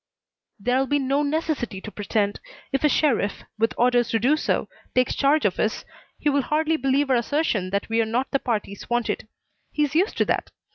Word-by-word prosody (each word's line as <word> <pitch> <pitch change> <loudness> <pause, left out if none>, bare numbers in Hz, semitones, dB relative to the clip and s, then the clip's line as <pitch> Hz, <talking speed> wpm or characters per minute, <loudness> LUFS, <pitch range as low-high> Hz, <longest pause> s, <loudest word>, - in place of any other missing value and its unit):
"There'll 250 +5 +1
be 290 - +2
no 275 +1 +1
necessity 295 -8 -1
to 215 - -8
pretend. 205 0 -1 0.3
If 270 +1 0
a 300 - +5
sheriff, 240 -10 +1 0.2
with 225 +1 +1
orders 245 -1 +3
to 225 - +2
do 255 +7 +3
so, 310 - -1 0.3
takes 255 0 +3
charge 290 0 +2
of 190 - +1
us 215 - -1 0.3
he - - -3
will 285 -1 +3
hardly 310 +4 +1
believe 270 0 +1
our - - +5
assertion 235 - 0
that 200 +1 -1
we 225 0 +2
are - - +1
not 240 +4 -1
the 275 - +2
parties 210 -6 -3
wanted. 240 -2 -1 0.4
He's 295 -2 0
used 365 +7 +1
to - - +3
that. - - -1
255 Hz, 195 wpm, -24 LUFS, 225-290 Hz, 0.4 s, a